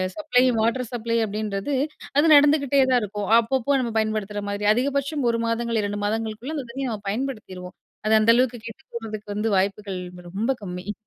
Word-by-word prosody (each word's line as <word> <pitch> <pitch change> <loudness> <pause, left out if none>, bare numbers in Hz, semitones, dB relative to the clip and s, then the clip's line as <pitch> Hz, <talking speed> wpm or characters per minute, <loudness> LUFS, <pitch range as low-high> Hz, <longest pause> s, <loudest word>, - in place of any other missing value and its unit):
Supply 300 -5 +2 0.2
water 230 +2 0
supply 230 0 -1
அப்படின்றது 210 +4 -3 0.4
அது 295 - +5
நடந்துகிட்டே 285 -1 +4
தான் 245 -2 +4
இருக்கும். 205 -1 -4
அப்பப்போ 265 +4 +1
நம்ம 235 -3 -2
பயன்படுத்துகிற 215 -2 -1
மாதிரி 205 +1 -2
அதிகபட்சம் 280 +2 -1
ஒரு 230 - -1
மாதங்கள், 230 -1 0
ரெண்டு 205 0 -4
மாதங்களுக்குள்ள 225 +7 -3
அந்த 270 - -4
தண்ணீய 265 +1 -3
நம்ப 215 -3 -5
பயன்படுத்திடுவோம். 215 -7 -5 0.3
அது 220 - +3
அந்த 220 +2 +5
அளவுக்கு 245 -1 +1
கெட்டு 230 - -10
போறதுக்கு 215 -2 -6
வந்து 220 +2 0
வாய்ப்புகள் 195 0 -1 0.3
ரொம்ப 220 +8 0
கம்மி. 180 +2 -5
225 Hz, 165 wpm, -24 LUFS, 210-260 Hz, 0.4 s, அது